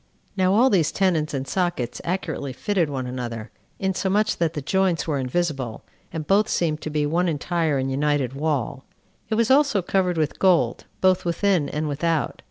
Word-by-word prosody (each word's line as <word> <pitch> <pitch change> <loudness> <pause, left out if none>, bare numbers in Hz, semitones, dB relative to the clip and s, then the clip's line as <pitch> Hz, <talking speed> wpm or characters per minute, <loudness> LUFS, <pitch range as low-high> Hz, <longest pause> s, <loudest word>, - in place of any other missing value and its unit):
Now 190 0 +3
all 250 +4 +5
these 170 -7 +3
tenons 170 -6 +1
and 135 -1 -3
sockets 175 -10 -2
accurately 170 -6 -3
fitted 180 +2 0
one 135 -3 -3
another, 120 -3 -5 0.3
insomuch 195 +2 0
that 165 -2 0
the 150 - -4
joints 190 +1 +1
were 145 -3 0
invisible, 135 -4 -2 0.3
and 160 -2 -4
both 205 +6 +3
seemed 155 -3 0
to - - -4
be 150 -1 0
one 170 +5 +1
entire 160 -1 0
and 135 0 -1
united 140 -2 0
wall. 140 -3 -2 0.5
It 220 - +1
was 230 +2 +2
also 270 -8 +4
covered 180 -1 +1
with 155 -2 -1
gold, 170 -11 +2 0.2
both 185 -1 +3
within 175 -2 +1
and 150 +1 -2
without. 155 0 -1
160 Hz, 175 wpm, -23 LUFS, 140-185 Hz, 0.5 s, all